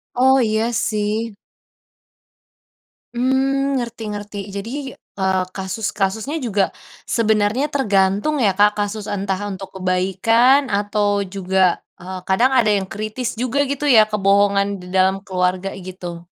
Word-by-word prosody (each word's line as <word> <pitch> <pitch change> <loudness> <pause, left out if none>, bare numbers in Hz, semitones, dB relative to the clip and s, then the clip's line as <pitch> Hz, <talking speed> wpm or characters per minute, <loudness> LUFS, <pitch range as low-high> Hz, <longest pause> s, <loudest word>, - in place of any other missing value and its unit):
Oh, 265 +2 +5
iya, 220 0 +1
sih. 215 0 -1 1.8
Mmm, 270 +2 +1
ngerti 235 -3 -4
ngerti. 205 0 -7 0.2
Jadi, 200 +3 -5 0.5
eee, 190 -1 +1
kasus 190 +2 -3
kasusnya 220 +10 -2
juga, 205 -7 0 0.3
sebenarnya 220 +4 +1
tergantung 210 +1 +1
ya, 200 -6 +2
Kak, 205 +1 +5
kasus 205 +1 -2
entah 195 -1 -2
untuk 195 0 -7
kebaikan 215 +9 +2
atau 205 0 +1
juga, 190 -1 +1 0.2
eee, 185 0 -7
kadang 215 +8 +2
ada 230 -4 +4
yang 195 -2 0
kritis 215 +5 -4
juga, 250 +4 -1
gitu 280 +1 -3
ya? 215 -1 +7
Kebohongan 200 -1 +2
di 180 - -11
dalam 190 +1 +3
keluarga, 185 0 -1
gitu. 175 -2 -7
205 Hz, 125 wpm, -20 LUFS, 190-235 Hz, 1.8 s, ya